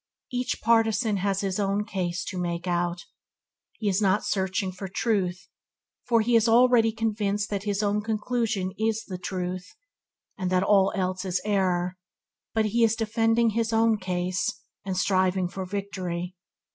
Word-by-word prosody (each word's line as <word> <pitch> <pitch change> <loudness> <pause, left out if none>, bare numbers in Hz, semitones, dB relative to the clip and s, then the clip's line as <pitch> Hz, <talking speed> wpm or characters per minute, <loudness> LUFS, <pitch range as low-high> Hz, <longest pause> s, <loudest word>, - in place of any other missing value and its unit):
Each 250 0 -2
partisan 225 -1 +3
has 195 0 0
his 195 0 -2
own 200 +1 0
case 180 -5 -2
to 185 - -4
make 170 0 -2
out. 175 0 -1 0.7
He 215 - -3
is 195 +1 +2
not 200 0 +2
searching 190 0 -1
for 190 +1 -7
truth, 180 -3 -1 0.6
for 230 -2 +4
he 235 +2 +2
is 225 0 +4
already 235 -1 +5
convinced 210 -2 -1
that 200 0 -2
his 205 0 0
own 205 +1 +1
conclusion 215 -3 -1
is 220 0 0
the 185 -2 -6
truth, 180 - -4 0.6
and 185 -1 -1
that 185 0 +2
all 195 -1 +4
else 185 -1 -1
is 185 -1 -1
error; 185 -3 +1 0.6
but 220 -1 +3
he 230 +3 +2
is 225 -1 +4
defending 225 +1 +2
his 225 +1 0
own 225 -1 +3
case, 180 -1 -1 0.3
and 190 -2 -3
striving 185 -1 +2
for 190 +1 -6
victory. 185 -3 -4
200 Hz, 160 wpm, -26 LUFS, 185-220 Hz, 0.7 s, already